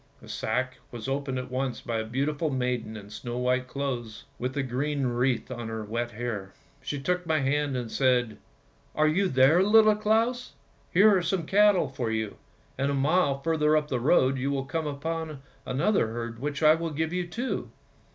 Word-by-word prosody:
The - - -15
sack 130 +3 -2
was 120 0 -7
opened 135 -1 -2
at 125 0 -5
once 130 -1 -2
by 115 -1 -3
a - - -1
beautiful 140 +7 -1
maiden 125 -4 -2
in 100 -1 -11
snow 120 +2 -5
white 125 +1 0
clothes 125 -5 -4
with 130 +3 -3
a 140 - +1
green 135 +2 -1
wreath 125 +1 0
on 120 -2 -5
her 110 -1 -4
wet 115 +3 -3
hair; 110 -4 -5 0.3
she 145 - -4
took 180 +4 -1
my 160 -1 +2
hand 140 0 0
and 120 -3 -4
said, 125 -5 +1 0.3
' 60 - -34
Are 155 0 +3
you 190 +6 +2
there, 135 +3 +5
Little 215 +2 +6
Claus? 225 +4 0 0.4
Here 205 +3 +6
are 185 - +2
some 175 -1 -1
cattle 200 -3 +4
for 130 -3 -3
you, 110 -2 -2 0.4
and 135 +1 +1
a 140 - 0
mile 140 0 +2
further 155 -2 +3
up 150 -1 -1
the 125 - 0
road 130 0 +3
you 135 +2 -1
will 135 -1 -1
come 160 +3 -2
upon 155 0 -4 0.2
another 140 - +2
herd, 115 0 -5
which 145 +3 -3
I 155 0 +8
will 165 +1 -2
give 160 +2 -2
you 180 -1 -1
too! 240 +9 -3
135 Hz, 195 wpm, -27 LUFS, 125-160 Hz, 0.4 s, I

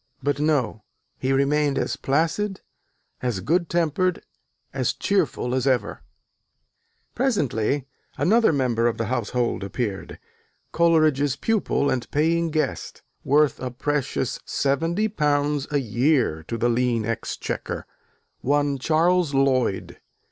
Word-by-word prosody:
But 145 0 0
no: 145 -8 0 0.4
he 130 - 0
remained 140 +1 +2
as - - -1
placid, 165 +8 0 0.6
as 120 -6 -1
good 165 - 0
tempered, 170 +2 0 0.5
as - - 0
cheerful 160 -10 0
as 130 +1 0
ever. 130 -2 0 1.1
Presently 145 - 0 0.3
another 225 +2 +4
member 125 -5 +1
of 120 - -1
the 115 - -1
household 120 -2 -1
appeared, 100 0 -4 0.5
Coleridge's 155 -5 +3
pupil 210 -7 0
and 125 -2 -2
paying 165 +3 +1
guest, 155 0 -3 0.2
worth 150 +1 +3
a 130 - -3
precious 130 0 -2
£70 150 -2 0
a 145 - +2
year 120 - +1
to 115 - -3
the 120 - +1
lean 120 -2 +1
exchequer, 115 0 -4 0.5
one 145 0 +1
Charles 165 +1 +2
Lloyd. 130 -7 +1
140 Hz, 110 wpm, -24 LUFS, 125-160 Hz, 1.1 s, another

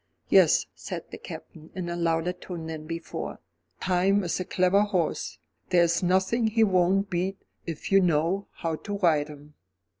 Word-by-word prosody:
"Yes," - - +5
said - - -6
the - - -8
Captain, 160 0 -10
in 185 -2 -4
a 170 - -3
louder 170 +1 0
tone 180 -2 -7
than 160 -1 -6
before, 165 0 -5 0.4
"Time 190 +2 +2
is 175 - -1
a 185 - -2
clever 185 +2 +3
horse. 190 -6 -1 0.3
There 175 -2 +5
is 170 0 +2
nothing 190 +6 +2
he 220 +1 +3
won't 195 0 +2
beat 185 +2 -1 0.3
if 165 +2 -5
you 195 - +7
know 175 +3 +1
how 165 -2 -3
to 205 +3 -5
ride 160 -6 +3
him." 150 0 -13
180 Hz, 170 wpm, -27 LUFS, 165-195 Hz, 0.4 s, you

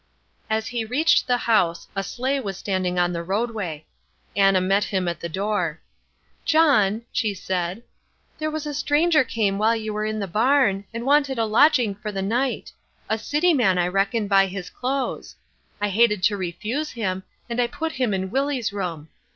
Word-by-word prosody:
As 220 0 -1
he 240 -2 -2
reached 300 +10 +2
the 245 -1 +3
house 210 -8 +1
a 195 - 0
sleigh 260 +7 -2
was 195 -7 -5
standing 185 -2 -1
on 175 0 +2
the 170 - -3
roadway. 195 -4 -3 0.5
Anna 195 -1 +4
met 195 +2 +2
him 190 -3 -1
at 170 - -2
the 170 - -5
door. 190 -3 -1 0.6
"John," 250 -10 +3
she 210 -3 -1
said, 185 +3 -3 0.6
"there 310 0 -1
was 310 -1 -4
a 295 - -4
stranger 300 +2 +3
came 210 -5 -1
while 220 +2 +3
you 215 -1 -4
were 210 0 -2
in 215 0 -2
the 205 - -2
barn, 215 -1 +2
and 230 +1 -5
wanted 280 -1 +3
a 225 - +1
lodging 235 0 +4
for 210 +2 -6
the 195 -1 -3
night; 245 +6 -1 0.4
a 220 - +1
city 320 +9 +2
man, 210 -10 +3
I 175 0 +1
reckon, 200 +3 0
by 195 -1 +4
his 190 -1 -7
clothes. 265 +1 -3 0.4
I 205 0 0
hated 210 -1 +3
to 205 0 +3
refuse 210 - -3
him, 190 -5 -3 0.3
and 240 0 -1
I 240 - +2
put 320 +7 -4
him 255 -6 -1
in 190 -1 -2
Willie's 270 -5 -1
room. 170 -6 -4
215 Hz, 185 wpm, -23 LUFS, 195-255 Hz, 0.6 s, Anna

